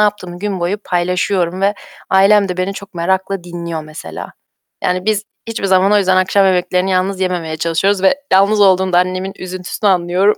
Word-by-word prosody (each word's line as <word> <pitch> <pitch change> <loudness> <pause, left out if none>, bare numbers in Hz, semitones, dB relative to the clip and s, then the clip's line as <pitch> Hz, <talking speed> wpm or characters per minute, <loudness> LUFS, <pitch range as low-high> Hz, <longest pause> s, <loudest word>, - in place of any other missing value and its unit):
yaptığımı 205 -4 -1
gün 200 -2 -3
boyu 185 +4 -1
paylaşıyorum 180 0 -1
ve 200 +1 +2 0.4
ailem 195 +1 +4
de 180 - -3
beni 185 +2 -1
çok 200 -1 -10
merakla 190 +1 -1
dinliyor 170 -2 -5
mesela. 155 +2 -9 0.5
Yani 180 0 0
biz 215 -1 +1 0.3
hiçbir 220 -3 -4
zaman 190 +1 +3
o 210 - +5
yüzden 185 -1 +2
akşam 190 +1 +3
yemeklerini 180 0 +1
yalnız 185 +1 0
yememeye 175 -4 -2
çalışıyoruz 175 +5 0
ve 190 - +5 0.2
yalnız 200 +2 +4
olduğunda 190 -2 +4
annemin 185 +1 -1
üzüntüsünü 185 +2 -2
anlıyorum. 185 +3 +2
185 Hz, 170 wpm, -16 LUFS, 180-195 Hz, 0.5 s, o